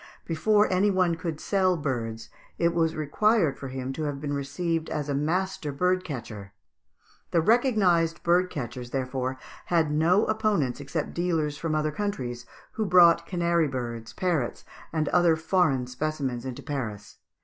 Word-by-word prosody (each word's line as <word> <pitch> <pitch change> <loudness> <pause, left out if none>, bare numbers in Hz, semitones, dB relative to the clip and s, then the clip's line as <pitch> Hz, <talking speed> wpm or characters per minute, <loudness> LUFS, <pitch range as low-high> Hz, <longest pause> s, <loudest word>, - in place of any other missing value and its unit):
Before 210 +6 +3
any 195 +3 +3
one 185 -3 +2
could 165 -2 -4
sell 185 -3 +1
birds 115 -6 -4 0.3
it 170 0 +2
was 165 -1 +1
required 160 +1 +2
for 135 - -6
him 130 0 -4
to 155 +2 -3
have 145 -1 -3
been 145 0 -3
received 160 +4 -2
as 150 -2 -3
a - - 0
master 160 +2 -1
bird 180 +5 +1
catcher. 110 - -7 0.8
The 170 - +2
recognised 180 - +2
bird 180 +2 +3
catchers, 125 -4 -6
therefore, 130 0 -2 0.3
had 165 -3 +2
no 170 +7 +3
opponents 210 - 0
except 145 +2 -4
dealers 165 -4 0
from 160 -2 -1
other 155 0 0
countries, 125 -11 -4 0.2
who 220 - -2
brought 170 -2 +6
canary 170 -3 +1
birds, 120 -4 -5
parrots, 165 -10 -1 0.3
and 155 -2 0
other 175 -2 +4
foreign 160 -5 +1
specimens 130 -1 -3
into 125 - -6
Paris. 120 -9 -5
155 Hz, 150 wpm, -27 LUFS, 135-180 Hz, 0.8 s, brought